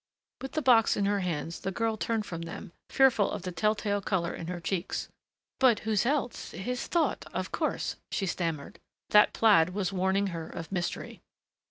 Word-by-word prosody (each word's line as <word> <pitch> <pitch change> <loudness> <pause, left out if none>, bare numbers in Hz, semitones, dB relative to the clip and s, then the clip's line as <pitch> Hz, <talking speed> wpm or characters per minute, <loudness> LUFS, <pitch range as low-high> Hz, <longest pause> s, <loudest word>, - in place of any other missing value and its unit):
With 265 - -6
the 310 - -1
box 235 -3 +5
in 200 - +1
her 200 0 +1
hands 165 -3 -3
the - - -3
girl 225 +3 0
turned 220 0 -1
from 165 -4 -6
them, 170 +3 -7 0.2
fearful 260 -7 +4
of - - -5
the 185 - -4
tell 210 +6 +1
tale 205 -1 -1
color 180 -3 -1
in 165 - -6
her 180 0 -4
cheeks. 180 +1 -3 0.5
"But 250 -5 +4
whose 220 +1 +1
else 275 -3 -1
his 245 +6 -4
thought, 340 -2 0
of - - -3
course," - - -2
she 195 - -1
stammered. 165 -5 -3 0.3
That 210 0 +7
plaid 185 -5 +4
was 200 -2 -1
warning 190 +2 +1
her 165 -1 -5
of 165 +1 -7
mystery. 175 -2 -3
200 Hz, 185 wpm, -29 LUFS, 175-225 Hz, 0.5 s, That